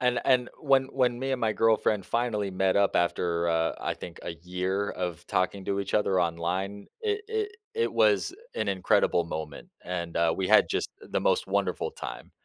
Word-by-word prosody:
And 125 Hz, -1 st, +2 dB
and 125 Hz, -2 st, +3 dB
when 135 Hz, -3 st, +4 dB
when 125 Hz, -3 st, +1 dB
me 135 Hz, +1 st, -2 dB
and 130 Hz, -, -1 dB
my 110 Hz, -1 st, +2 dB
girlfriend 110 Hz, -3 st, +2 dB
finally 110 Hz, -4 st, 0 dB
met 95 Hz, +1 st, +1 dB
up 100 Hz, -1 st, +3 dB
after, 85 Hz, -1 st, +1 dB
uh, 80 Hz, 0 st, +1 dB
I -, -, -1 dB
think 85 Hz, -, -9 dB
a -, -, -4 dB
year 90 Hz, +4 st, -2 dB
of 90 Hz, -1 st, -4 dB
talking 95 Hz, +1 st, 0 dB
to 100 Hz, 0 st, 0 dB
each 100 Hz, -, -4 dB
other 95 Hz, -3 st, +3 dB
online, 90 Hz, +4 st, -2 dB
it 420 Hz, -1 st, 0 dB
it 435 Hz, -2 st, -2 dB, 0.2 s
it 455 Hz, 0 st, 0 dB
was -, -, +3 dB, 0.2 s
an -, -, -1 dB
incredible 90 Hz, -2 st, +2 dB
moment 80 Hz, -3 st, -6 dB, 0.2 s
and, 85 Hz, -2 st, -4 dB
uh, 85 Hz, -1 st, +3 dB
we 95 Hz, -, 0 dB
had 110 Hz, +2 st, +6 dB
just -, -, -1 dB
the -, -, -2 dB
most -, -, +2 dB
wonderful 95 Hz, -1 st, 0 dB
time, -, -, -8 dB
95 Hz, 190 wpm, -28 LUFS, 85-120 Hz, 0.2 s, had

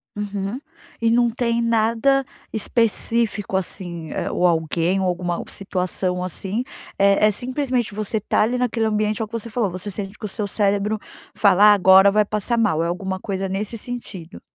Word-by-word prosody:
Uhum. 205 Hz, +3 st, -4 dB, 0.4 s
E 230 Hz, -, +3 dB
não 240 Hz, 0 st, +4 dB
tem 235 Hz, -1 st, 0 dB
nada 230 Hz, +4 st, +2 dB, 0.3 s
específico, 225 Hz, -2 st, 0 dB
assim, 175 Hz, -3 st, -4 dB
eh, -, -, -2 dB
ou 180 Hz, -, +1 dB
alguém 170 Hz, +2 st, +1 dB
ou 190 Hz, -, 0 dB
alguma 175 Hz, -1 st, -2 dB
situação, 185 Hz, -1 st, -2 dB
assim, 195 Hz, +6 st, -3 dB, 0.3 s
é 200 Hz, +1 st, +4 dB
é -, -, +3 dB
simplesmente 250 Hz, -1 st, -2 dB
você 215 Hz, +1 st, -2 dB
tá 210 Hz, -, 0 dB
ali 240 Hz, +4 st, +1 dB
naquele 240 Hz, -2 st, 0 dB
ambiente, 215 Hz, 0 st, 0 dB
é -, -, 0 dB
o -, -, -15 dB
que 230 Hz, -, -30 dB
você 230 Hz, 0 st, -4 dB
falou. 220 Hz, -3 st, 0 dB
Você 185 Hz, +3 st, -6 dB
sente 195 Hz, +1 st, -6 dB
que -, -, -7 dB
o -, -, -1 dB
seu 205 Hz, +1 st, -3 dB
cérebro 205 Hz, +1 st, 0 dB, 0.4 s
fala: 200 Hz, 0 st, +5 dB
"Ah, -, -, +8 dB
agora 190 Hz, 0 st, +6 dB
vai 210 Hz, 0 st, +3 dB
passar 215 Hz, +3 st, -1 dB
mal." 185 Hz, -8 st, +2 dB
É -, -, 0 dB
alguma 190 Hz, +2 st, -3 dB
coisa 195 Hz, -1 st, -3 dB
nesse 205 Hz, +4 st, -3 dB
sentido. 205 Hz, -7 st, -7 dB
205 Hz, 180 wpm, -22 LUFS, 190-230 Hz, 0.4 s, Ah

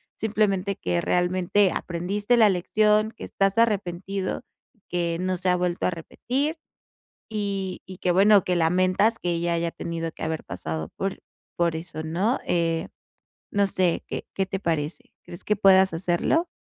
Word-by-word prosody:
Simplemente, 200 Hz, -3 st, 0 dB
que 85 Hz, -1 st, -1 dB
realmente 185 Hz, +2 st, +2 dB
aprendiste 200 Hz, +7 st, -1 dB
la 215 Hz, -3 st, +6 dB
lección. 210 Hz, +4 st, +2 dB
Que 230 Hz, -, -12 dB
estás 195 Hz, +1 st, 0 dB
arrepentido, 195 Hz, -2 st, -1 dB, 0.5 s
que 170 Hz, -1 st, -1 dB
no 185 Hz, 0 st, -1 dB
se 185 Hz, +1 st, 0 dB
ha 180 Hz, -, +4 dB
vuelto 175 Hz, 0 st, 0 dB
a -, -, 0 dB
repetir, 265 Hz, -, -3 dB, 0.7 s
y 200 Hz, -3 st, -3 dB
y 185 Hz, -1 st, -10 dB
que 180 Hz, -, +1 dB
bueno, 200 Hz, +1 st, +6 dB
que 180 Hz, -, 0 dB
lamentas, 185 Hz, +6 st, +2 dB
que 175 Hz, -, -1 dB
ella 170 Hz, 0 st, 0 dB
haya 170 Hz, 0 st, -1 dB
tenido, 165 Hz, -1 st, -4 dB
que -, -, -9 dB
haber 160 Hz, -1 st, -2 dB
pasado 80 Hz, -3 st, -4 dB
por 195 Hz, 0 st, -3 dB, 0.4 s
por 170 Hz, -1 st, +1 dB
eso 160 Hz, -1 st, -6 dB
¿no? 185 Hz, +10 st, 0 dB
Eh, 165 Hz, -1 st, 0 dB, 0.6 s
no 200 Hz, 0 st, +3 dB
sé, 185 Hz, -3 st, 0 dB
¿qué -, -, -5 dB
qué 195 Hz, -, +1 dB
te 195 Hz, 0 st, -3 dB
parece? 160 Hz, -3 st, -3 dB
¿Crees 175 Hz, -, -9 dB
que 210 Hz, -, +1 dB
puedas 190 Hz, -2 st, +5 dB
hacerlo? 175 Hz, -, +1 dB
185 Hz, 160 wpm, -25 LUFS, 170-200 Hz, 0.7 s, la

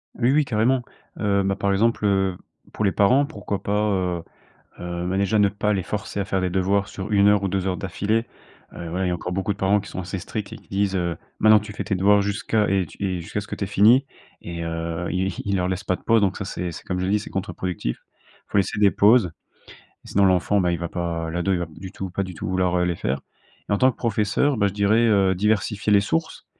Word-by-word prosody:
Oui, 120 Hz, +1 st, +2 dB
oui, 150 Hz, +1 st, +3 dB
carrément. 125 Hz, +2 st, +1 dB, 0.4 s
Heu 100 Hz, -1 st, +2 dB
bah, 95 Hz, 0 st, 0 dB
par 100 Hz, 0 st, 0 dB
exemple, 110 Hz, +2 st, +1 dB
heu, 95 Hz, -2 st, +1 dB, 0.3 s
pour 110 Hz, -, -2 dB
les 100 Hz, -, +3 dB
parents, 125 Hz, +10 st, +4 dB
pourquoi 105 Hz, -, -5 dB
pas, 105 Hz, +1 st, 0 dB
heu 90 Hz, -4 st, -1 dB, 0.6 s
heu, 85 Hz, 0 st, -4 dB
bah, 95 Hz, +1 st, -1 dB
déjà 100 Hz, +2 st, +2 dB
ne 100 Hz, -, +5 dB
pas 105 Hz, +1 st, -1 dB
les 95 Hz, -3 st, 0 dB
forcer 100 Hz, +1 st, -4 dB
à 100 Hz, -, -1 dB
faire 95 Hz, -1 st, -1 dB
des 90 Hz, -, 0 dB
devoirs 95 Hz, +2 st, +1 dB
sur 100 Hz, +2 st, -6 dB
1 100 Hz, 0 st, +5 dB
heure 105 Hz, -1 st, +3 dB
ou -, -, +1 dB
2 95 Hz, 0 st, -1 dB
heures 95 Hz, -1 st, -1 dB
d'affilée. 105 Hz, +3 st, -1 dB, 0.5 s
Heu, 85 Hz, -, -7 dB
ouais, 95 Hz, +2 st, -1 dB
il -, -, +1 dB
y -, -, 0 dB
a -, -, 0 dB
encore 90 Hz, +1 st, -5 dB
beaucoup 95 Hz, +2 st, -1 dB
de -, -, -17 dB
parents 100 Hz, +1 st, +2 dB
qui 100 Hz, -, -9 dB
sont 95 Hz, -, -5 dB
assez 95 Hz, +1 st, -5 dB
stricts 105 Hz, +3 st, -5 dB
et -, -, -7 dB
qui -, -, -22 dB
disent, 100 Hz, -1 st, 0 dB
heu: 85 Hz, -2 st, -1 dB, 0.2 s
«Maintenant, 110 Hz, 0 st, +6 dB
tu 105 Hz, -, -8 dB
fais 105 Hz, -, -5 dB
tes 100 Hz, -, 0 dB
devoirs 100 Hz, +2 st, +4 dB
jusqu'à 105 Hz, +1 st, 0 dB
et 95 Hz, -1 st, +1 dB
t, 80 Hz, -, -15 dB
et 95 Hz, -3 st, -1 dB
jusqu'à 85 Hz, +5 st, -4 dB
ce 105 Hz, -, -8 dB
que -, -, -5 dB
t'aies 100 Hz, -, -3 dB
fini». 110 Hz, +7 st, +5 dB, 0.4 s
Et 85 Hz, -1 st, -6 dB
heu, 85 Hz, +1 st, -3 dB
ils 95 Hz, +1 st, 0 dB
ils 100 Hz, -1 st, 0 dB
leur 90 Hz, -1 st, 0 dB
laissent 95 Hz, +2 st, -3 dB
pas 95 Hz, -, +1 dB
de -, -, -15 dB
pause. 115 Hz, 0 st, +3 dB
Donc 95 Hz, -2 st, +1 dB
ça, -, -, -4 dB
c'est 90 Hz, -2 st, -4 dB
c'est -, -, -9 dB
comme 90 Hz, -1 st, -3 dB
je 90 Hz, -, -1 dB
dis, 105 Hz, +2 st, +2 dB
c'est 105 Hz, -, -8 dB
contre-productif. 90 Hz, -8 st, -3 dB
Il -, -, -31 dB
faut -, -, +1 dB
laisser 100 Hz, +1 st, +1 dB
des 100 Hz, -2 st, +5 dB
pauses, 105 Hz, -3 st, +4 dB, 0.7 s
sinon 100 Hz, 0 st, +2 dB
l'enfant, 95 Hz, +2 st, +3 dB
bah, 90 Hz, -2 st, +1 dB
il -, -, -1 dB
va 85 Hz, -1 st, -4 dB
pas 85 Hz, -2 st, -3 dB
l'ado, 90 Hz, +3 st, 0 dB
il 90 Hz, -, 0 dB
va 85 Hz, -, -3 dB
pas -, -, -19 dB
du 95 Hz, +3 st, -9 dB
tout 95 Hz, -, -5 dB
pas 100 Hz, +2 st, -2 dB
du 95 Hz, -1 st, -7 dB
tout 80 Hz, -, -5 dB
vouloir, 90 Hz, -1 st, +1 dB
heu, 90 Hz, -, +2 dB
les 90 Hz, -1 st, 0 dB
faire. 65 Hz, -, -2 dB, 0.5 s
Et -, -, -2 dB
en 100 Hz, -, +3 dB
tant 130 Hz, +5 st, +4 dB
que -, -, -19 dB
professeur, 115 Hz, +5 st, +1 dB
bah, 100 Hz, -1 st, +3 dB
je 100 Hz, -, -4 dB
dirais, 105 Hz, +3 st, +3 dB
heu, 100 Hz, -3 st, +3 dB
diversifier 105 Hz, +1 st, +1 dB
les 100 Hz, -, +6 dB
sources. 160 Hz, +10 st, -2 dB
100 Hz, 265 wpm, -23 LUFS, 90-105 Hz, 0.7 s, Maintenant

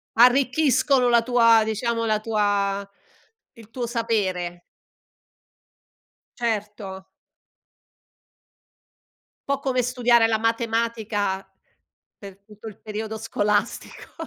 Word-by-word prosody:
Arricchiscono 255 Hz, +1 st, +3 dB
la 235 Hz, -1 st, +4 dB
tua 230 Hz, -2 st, +4 dB
diciamo 230 Hz, +1 st, -2 dB
la 215 Hz, -1 st, +1 dB
tua 205 Hz, -2 st, -1 dB, 0.7 s
il 225 Hz, -3 st, -17 dB
tuo 240 Hz, 0 st, -4 dB
sapere. 195 Hz, -7 st, -2 dB, 1.8 s
Certo. 210 Hz, -4 st, -4 dB, 2.4 s
Po' 280 Hz, -1 st, 0 dB
come 260 Hz, -2 st, 0 dB
studiare 240 Hz, -1 st, +3 dB
la 225 Hz, -1 st, +1 dB
matematica 225 Hz, -3 st, -1 dB, 0.7 s
per 195 Hz, -1 st, -12 dB
tutto 215 Hz, +1 st, -13 dB
il 210 Hz, -, -16 dB
periodo 220 Hz, 0 st, -5 dB
scolastico. 210 Hz, 0 st, -2 dB
225 Hz, 85 wpm, -23 LUFS, 205-235 Hz, 2.4 s, la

